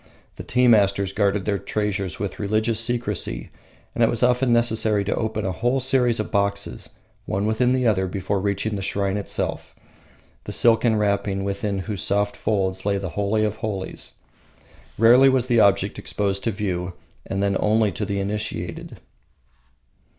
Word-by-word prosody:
The - - -7
tea 125 0 +2
masters 100 -3 +3
guarded 100 -1 +1
their 100 -2 0
treasures 100 -4 -2
with 100 -1 -5
religious 110 +2 +1
secrecy, 115 - -1 0.4
and - - +1
it - - +4
was 120 +1 -1
often 125 +1 +3
necessary 110 -3 +2
to 100 - -1
open 110 -2 -2
a 95 - -1
whole 120 +7 0
series 125 -3 +2
of 105 - -3
boxes, 100 +1 -1 0.3
one 100 +2 -1
within 125 +4 +2
another, 110 -7 +1
before 95 +2 -2
reaching 100 +2 -1
the 100 - -4
shrine 100 0 -1
itself 100 -1 -3 0.7
the - - -5
silken 115 -1 +3
wrapping 100 -2 0
within 100 +1 -2
whose 105 -4 -4
soft 100 +1 0
folds 95 -3 -1
lay 100 0 +1
the 95 -1 -4
holy 105 +4 0
of 105 0 -3
holies. 100 -4 -5 0.8
Rarely 125 +5 +6
was 130 -2 +2
the 120 -2 +2
object 100 -2 +2
exposed 100 -1 -2
to 115 - +1
view, 90 -4 -3 0.3
and 95 +1 -2
then 100 0 +1
only 110 0 +2
to 105 - -4
the 100 -1 -2
initiated. 100 -3 -4
105 Hz, 160 wpm, -23 LUFS, 100-115 Hz, 0.8 s, Rarely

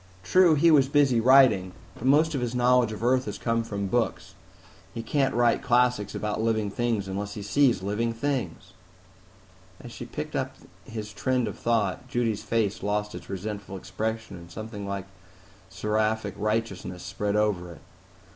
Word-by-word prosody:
True, 180 - +5
he 165 +3 +5
was 140 -4 +5
busy 140 -4 +3
writing. 115 -8 +5 0.2
But 120 - -9
most 155 +4 +4
of 135 - -1
his 120 0 -2
knowledge 125 -2 +3
of 110 0 -6
Earth 125 +1 +2
has 105 -1 -5
come 115 +1 0
from 100 -3 -4
books; 120 +4 -1 0.6
he 115 - -4
can't 135 +1 0
write 120 -1 +3
classics 125 -5 +2
about 105 0 -2
living 110 -2 0
things 115 -3 -1
unless 100 +2 -4
he 105 - -6
sees 115 -1 +2
living 105 +4 -1
things." 115 - -3 1.1
As - - -10
she - - -8
picked - - -6
up - - -2 0.3
his 110 -1 -7
trend 125 -3 0
of 105 - -5
thought, 115 +1 0
Judy's 120 -5 -1
face 110 -4 -1
lost 105 +1 -1
its - - -9
resentful 100 0 -5
expression, 105 +2 -4
and 85 0 -12
something 105 +2 -7
like 100 -1 -4 0.6
seraphic 105 0 -1
righteousness 105 -4 -2
spread 100 +3 -2
over 100 -5 0
it. - - -16
110 Hz, 165 wpm, -26 LUFS, 100-125 Hz, 1.1 s, True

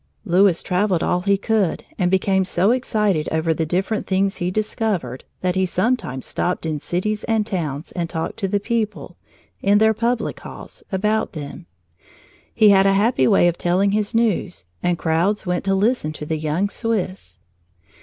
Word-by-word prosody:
Louis 185 -1 +3
traveled 180 -2 +1
all 180 - +1
he 200 +1 +2
could 205 -3 0 0.2
and 180 -2 +2
became 190 +1 +2
so 185 +3 +2
excited 210 -9 0
over 160 +1 +1
the 160 0 -2
different 190 +6 -1
things 195 +1 +1
he 175 -1 -1
discovered 200 - -2 0.2
that 180 -1 +1
he 190 0 +1
sometimes 180 - -1
stopped 180 -1 -2
in 155 -2 -2
cities 210 +7 -2
and 220 -2 +1
towns 160 -7 -4
and 170 -2 -3
talked 160 -2 -4
to 200 -4 -1
the 200 +1 0
people, 220 0 -3 0.5
in 200 +1 +4
their 220 +1 +4
public 235 +2 -1
halls, - - -10
about 210 +3 0
them. 140 - -8 0.8
He 215 - +5
had 195 0 +5
a 195 - +4
happy 200 - +3
way 175 - +5
of 175 0 -1
telling 185 +3 +2
his 210 +1 -1
news, 210 - 0 0.2
and 175 -1 +1
crowds 170 +6 0
went 180 -1 -1
to 195 0 +2
listen 200 -6 +1
to 150 - -7
the 155 0 -2
young 160 +6 0
Swiss. 195 - -3
190 Hz, 175 wpm, -21 LUFS, 170-210 Hz, 0.8 s, He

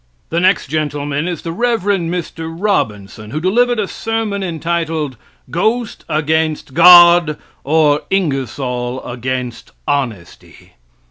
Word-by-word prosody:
The 165 - +1
next 185 +1 +2
gentleman 145 +1 -2
is 175 -4 -4
the 165 - -4
Rev. 230 +2 0
Mr. 170 -4 -2
Robinson, 110 - -2
who 150 - -3
delivered 240 +8 +2
a 210 -2 -1
sermon 225 -2 -3
entitled 165 -4 -2 0.4
'Ghost 220 +6 -1
against 155 -1 -1
God, 175 -1 +7 0.3
or 150 0 +2
Ingersoll 130 - -2
against 125 0 -5 0.2
Honesty.' 125 -11 -4
160 Hz, 110 wpm, -16 LUFS, 140-180 Hz, 0.4 s, God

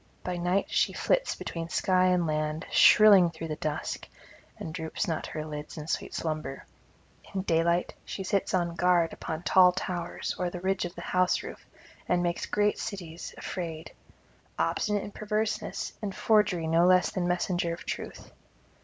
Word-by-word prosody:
By 180 -1 -3
night 180 +3 +1
she - - +2
flits - - +1
between 165 -1 -5
sky 185 +1 +2
and 180 -2 +2
land, 155 0 -2
shrilling 200 -5 +7
through 165 0 -7
the 155 - -2
dusk, 150 -1 -3 0.5
and 160 - -6
droops 160 -2 -3
not 160 -2 -2
her 155 0 -5
lids 150 +1 -7
in 150 - -6
sweet 155 - -3
slumber; 155 -4 -4 0.7
in 190 - -1
daylight 170 0 +1
she 195 - -5
sits 195 +1 0
on 175 -2 0
guard 175 -2 +3
upon 160 +1 -5
tall 180 -1 +6
towers 180 -1 -3
or 180 -1 0
the 180 - -6
ridge 190 +1 0
of 175 - -7
the 170 - -7
house 180 +1 +1
roof, - - -10 0.4
and 180 0 +2
makes 175 0 -1
great 210 0 +1
cities 175 -5 -6
afraid; 165 -3 -5 0.7
obstinate 210 -2 0
in 205 - -7
perverseness 215 +1 -2
and 200 -3 -4
forgery 210 -7 +2
no 165 +2 +4
less 185 -1 +4
than 185 -3 -1
messenger 175 -1 0
of 170 - -7
truth. - - -6
175 Hz, 165 wpm, -28 LUFS, 165-190 Hz, 0.7 s, shrilling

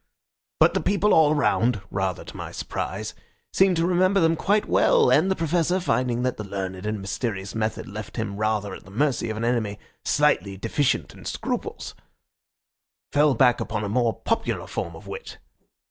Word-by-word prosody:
But - - +5
the - - 0
people 205 +1 +2
all 155 -1 +5
round 125 -5 +2
(rather 95 -2 -2
to - - -11
my - - -6
surprise) - - -4 0.4
seemed 190 -1 +4
to 165 0 +1
remember 185 +2 +3
them 165 -1 +3
quite 205 +5 +1
well, 480 -3 +4
and 190 - +4
the 190 - +2
Professor, 170 +2 +1
finding 125 -6 0
that 125 -1 -1
the 105 - -5
learned 95 -1 -5
and 105 -1 -2
mysterious 100 0 -3
method 110 0 -2
left 105 +3 -8
him 105 -3 -3
rather 105 -2 -1
at - - -9
the - - -15
mercy 120 +2 0
of 110 - -3
an 115 - -2
enemy 115 -4 0 0.3
slightly 140 -10 +2
deficient 120 +7 0
in - - -14
scruples, - - -4 1.2
fell 145 -1 +4
back 125 -2 +4
upon 105 - -3
a 105 - -2
more 115 +1 +1
popular 225 - -1
form - - -4
of - - -12
wit. 480 - -8
120 Hz, 175 wpm, -24 LUFS, 105-165 Hz, 1.2 s, But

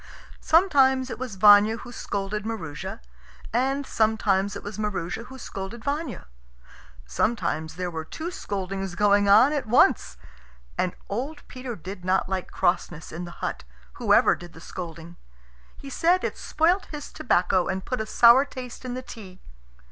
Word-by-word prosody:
Sometimes 270 -7 +3
it - - -6
was 250 -6 -5
Vanya 205 +3 +7
who 245 - -10
scolded 205 -2 -3
Maroosia, 165 - -5 0.5
and 270 +4 +1
sometimes 210 -4 +1
it - - -7
was 205 0 -7
Maroosia 205 0 -3
who 265 - -11
scolded 220 -1 -7
Vanya. 280 - -3 0.8
Sometimes 160 - -1
there 180 0 -3
were 160 -1 -4
two 325 - -6
scoldings 195 - -4
going 205 0 +3
on 225 +9 +7
at 285 -6 -2
once. 235 - +3 0.6
And 180 - -1
old 275 +9 -5
Peter 255 -2 -6
did 185 +1 -9
not 185 +1 +1
like 190 -1 -3
crossness 175 -2 -1
in 175 +2 -5
the 175 - -7
hut, - - -4 0.4
whoever - - +5
did 175 -1 -10
the - - -12
scolding. 170 0 -8 0.6
He 275 - -10
said 350 +6 +2
it - - -2
spoilt 350 +5 +1
his 295 -2 -8
tobacco 185 -4 +1
and 190 0 -3
put 255 -3 -2
a 220 - -4
sour 235 +4 +7
taste 255 -4 -9
in 250 -1 -4
the 255 - -5
tea. 190 -7 -11
210 Hz, 155 wpm, -25 LUFS, 185-255 Hz, 0.8 s, Vanya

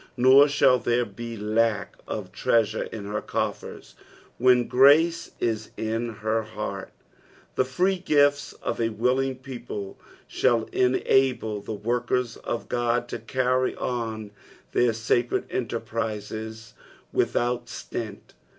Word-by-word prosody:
Nor 130 +3 +7
shall 135 -3 +4
there 120 0 +1
be 115 +2 -7
lack 110 +1 0
of - - -5
treasure 110 -2 +1
in 105 -3 -7
her 105 +1 -3
coffers - - -4 0.5
when 125 -1 +4
grace 160 +6 +5
is 110 -2 -1
in 115 +2 -2
her 110 +1 -1
heart; 110 0 -6 0.6
the - - +2
free 180 +9 +1
gifts 145 -5 +3
of - - -2
a 115 - +2
willing 125 +4 0
people 120 -6 -7 0.3
Bhail 120 -3 +1
enable 125 -4 +2
the 110 - -5
workers 120 +2 -1
for 120 - -3 0.3
Ood 120 - -4
to - - -4
carry 130 +3 0
on 110 -4 -3 0.4
their 120 -1 +3
sacred 115 +2 0
enterprises 110 -1 -4 0.4
without 120 0 0
stint. 110 -4 -7
120 Hz, 120 wpm, -25 LUFS, 110-130 Hz, 0.6 s, Nor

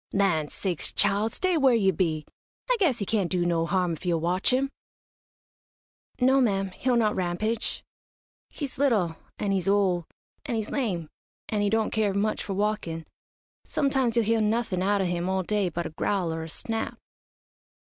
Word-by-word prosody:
"Land 175 -7 +2
sakes, 180 -5 -2
child, 205 +2 +2
stay 370 -2 +1
where 265 -4 +5
you 195 -4 +3
be! 155 -3 0 0.5
I - - +4
guess 315 - +3
he 200 - -2
can't 200 -4 0
do 180 -2 0
no 165 -1 +1
harm 180 -2 +1
if 160 - -8
you'll 175 -2 +1
watch 180 +6 +1
him." 270 +2 +1 1.5
"No 265 +1 +4
ma'am, 195 -5 +1
he'll 250 +6 0
not 215 -3 +2
rampage. 200 +5 -1 0.7
He's 280 -4 -6
little, 210 -12 +2 0.2
an' 205 - -1
he's 190 -2 0
ole, 190 -4 +2 0.4
an' 245 - -1
he's 220 -1 -3
lame, 195 - -1 0.4
an' 210 -1 0
he 205 - +2
don't 220 +1 +1
care 210 -3 +1
much 215 +2 0
for 195 - -4
walkin'. 195 -6 -1 0.6
Sometimes 270 -5 +1
you'll 235 -2 +3
hear 225 +1 +2
nothin' 215 -4 0
out 200 +1 +2
o' - - +1
him 175 0 -1
all 190 0 0
day 205 -1 0
but 170 +1 -3
a - - -4
growl 175 +1 -1
or 160 - -4
a 160 - -6
snap." 225 +7 -3
200 Hz, 180 wpm, -27 LUFS, 175-225 Hz, 1.5 s, where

